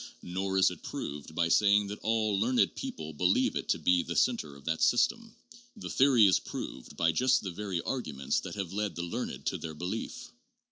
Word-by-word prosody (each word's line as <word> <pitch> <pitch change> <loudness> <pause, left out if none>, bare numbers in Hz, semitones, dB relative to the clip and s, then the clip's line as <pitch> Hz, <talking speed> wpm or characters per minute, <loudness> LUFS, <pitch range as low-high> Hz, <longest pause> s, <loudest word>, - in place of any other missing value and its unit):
Nor 95 +2 -2
is 95 -1 +5
it 90 - -10
proved 75 +2 -6
by 85 0 +2
saying 105 +3 +4
that 100 +1 -6
all 110 -2 +1
learned 125 +4 +2
people 80 0 -6
believe 90 +5 +2
it - - -4
to - - +3
be 90 -1 +3
the - - -5
center 70 -2 +1
of 70 - -15
that 80 -1 -1
system. 225 - +2 0.4
The 210 - -6
theory 130 -5 +5
is 95 - +4
proved - - -7
by 85 -1 +3
just 130 +9 +2
the 95 - -4
very 95 -2 -3
arguments 75 - -2
that - - -7
have 95 -3 -4
led 105 0 -2
the 85 - -3
learned 85 - -5
to - - -1
their 80 -2 -6
belief. 105 - -5
95 Hz, 200 wpm, -30 LUFS, 85-110 Hz, 0.4 s, is